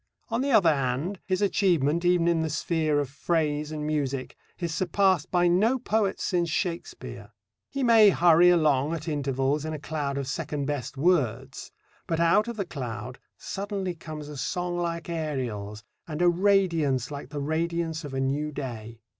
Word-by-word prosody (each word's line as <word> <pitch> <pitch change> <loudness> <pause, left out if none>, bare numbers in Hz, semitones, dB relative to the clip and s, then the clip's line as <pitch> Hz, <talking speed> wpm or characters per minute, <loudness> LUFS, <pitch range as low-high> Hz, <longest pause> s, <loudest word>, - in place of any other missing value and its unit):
On 230 +1 0
the 280 - 0
other 195 - +5
hand, 140 +8 -2
his 185 +1 0
achievement 170 -5 +2
even 175 -1 +3
in 170 -1 +3
the 160 - -1
sphere 155 -1 0
of 145 - -1
phrase 150 +1 -1
and 150 -1 -4
music 140 -4 -2 0.2
is 170 -3 -3
surpassed 185 -1 +1
by 175 -1 +3
no 210 +9 +3
poet 220 -5 0
since 175 -2 0
Shakespeare. 170 +2 -4 0.4
He 275 -1 -3
may 225 -3 +7
hurry 175 -1 +5
along 155 -3 +3
at 160 0 -7
intervals 140 -1 0
in 155 0 -4
a 155 - -5
cloud 140 -1 -3
of 140 -2 -3
second 145 +1 -3
best 140 -1 -4
words, 140 -8 0 0.4
but 165 - -1
out 170 +7 +4
of 235 -1 -5
the 200 - -2
cloud 125 -4 -6 0.2
suddenly 195 -2 -4
comes 155 -2 -8
a 150 -1 -8
song 175 +6 -2
like 170 -2 -3
Ariel's 125 -11 -4 0.2
and 155 -2 -5
a 175 - +6
radiance 170 - +2
like 140 -1 -7
the 150 - -5
radiance 165 +2 -2
of 140 -2 -6
a - - -1
new 140 +3 -1
day. 115 -5 -7
160 Hz, 170 wpm, -27 LUFS, 140-175 Hz, 0.4 s, may